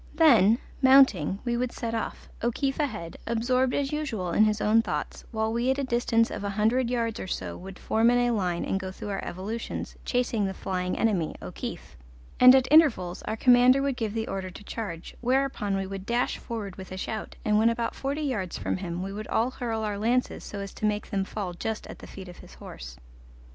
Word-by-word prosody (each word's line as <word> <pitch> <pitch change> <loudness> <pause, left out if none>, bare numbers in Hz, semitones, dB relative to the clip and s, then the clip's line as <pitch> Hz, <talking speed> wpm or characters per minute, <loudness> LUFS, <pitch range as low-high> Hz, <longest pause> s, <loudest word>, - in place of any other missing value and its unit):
Then, 235 - +6 0.2
mounting, 260 - +5
we 240 -1 0
would 245 0 -1
set 230 -1 -4
off, 225 - -4
O'Keefe 270 +4 -1
ahead, 215 - -3
absorbed 250 +3 +1
as 275 -1 -1
usual 230 - -2
in 215 +5 +5
his 215 0 +1
own 220 +2 +4
thoughts, - - -4
while 220 -1 -1
we 240 +2 0
at 265 - +2
a 280 - -1
distance 235 -2 +1
of 200 - -5
a 200 - -1
hundred 225 +5 +1
yards 230 -3 -1
or - - -5
so - - -4
would 190 0 -9
form 225 +1 +2
in 245 -1 +3
line 180 -4 -1
and 195 - -1
go 190 -1 -5
through 205 - -7
our 195 -1 -3
evolutions, 205 +6 -5
chasing 245 -4 0
the 190 0 -3
flying 180 -1 -2
enemy, 195 -8 +1
O'Keefe; - - -7 0.4
and 255 +1 +10
at 260 -1 +3
intervals 260 - +4
our 220 - -2
commander 250 +2 +5
would 275 -2 0
give 220 -3 -3
the 225 0 -2
order 190 -1 -4
to 185 - -11
charge, 200 -6 -6
whereupon 250 -5 0
we 195 - -2
would 195 0 -7
dash 240 +1 0
forward 210 -6 -6
with 190 -1 -9
a 185 - -5
shout, 215 +3 -5
and 210 0 +3
when 225 +1 +5
about 230 0 -1
forty 280 +3 -3
yards 215 - -2
from - - -2
him 180 -1 -4
we 195 +1 -5
would 215 +1 -6
all 235 +3 +1
hurl 230 -3 -3
our 205 -2 -2
lances 245 +4 0
so 205 - -7
as 200 0 -7
to - - -13
make 210 0 -2
them 195 -2 0
fall 190 -2 -4
just 220 +5 -4
at - - -10
the - - -11
feet 190 -1 -10
of 175 - -11
his - - -14
horse. - - -10
220 Hz, 215 wpm, -27 LUFS, 195-245 Hz, 0.4 s, and